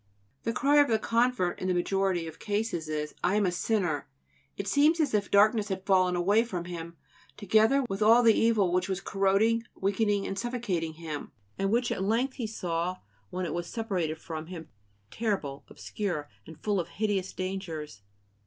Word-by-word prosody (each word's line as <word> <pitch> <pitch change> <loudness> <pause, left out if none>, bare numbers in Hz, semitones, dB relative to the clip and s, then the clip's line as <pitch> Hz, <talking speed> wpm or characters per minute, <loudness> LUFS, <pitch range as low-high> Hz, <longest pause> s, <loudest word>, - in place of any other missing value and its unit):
The 230 - +1
cry 285 +5 +3
of 290 -1 +6
the 225 - +3
convert 230 -4 +1
in 185 - -1
the 185 - +1
majority 185 -1 0
of 160 - -9
cases 205 -6 -2
is: 150 -1 -3
"I 180 +3 +2
am 210 -1 +3
a 180 - +1
sinner!" 175 -6 -1 0.5
It 200 - -4
seems 305 +4 +4
as 295 -6 +1
if 205 -2 +1
darkness 210 +1 +4
had 190 -1 -4
fallen 185 -2 +3
away 200 +6 +3
from 180 -7 -5
him, 170 -1 -7 0.4
together 220 +7 +3
with 195 0 -4
all 230 +3 +6
the 225 -1 +7
evil 215 -6 +3
which 185 +2 +1
was 190 -1 -1
corroding, 195 +4 +2 0.2
weakening, 200 +1 +1
and 195 - -3
suffocating 205 -10 -2
him, 155 -2 -7 0.3
and 195 - +1
which 240 +3 +1
at - - -2
length 230 +7 0
he 235 -4 -2
saw, 180 -4 -2 0.3
when 185 0 -3
it - - -3
was 175 0 -3
separated 180 -8 -2
from 160 -1 -7
him, 170 -2 -8 0.4
terrible, 190 -12 -2
obscure, 175 -8 -4 0.2
and 160 -1 -11
full 205 -2 +1
of 170 - -2
hideous 195 0 -1
dangers. 170 - -5
195 Hz, 180 wpm, -29 LUFS, 175-220 Hz, 0.5 s, the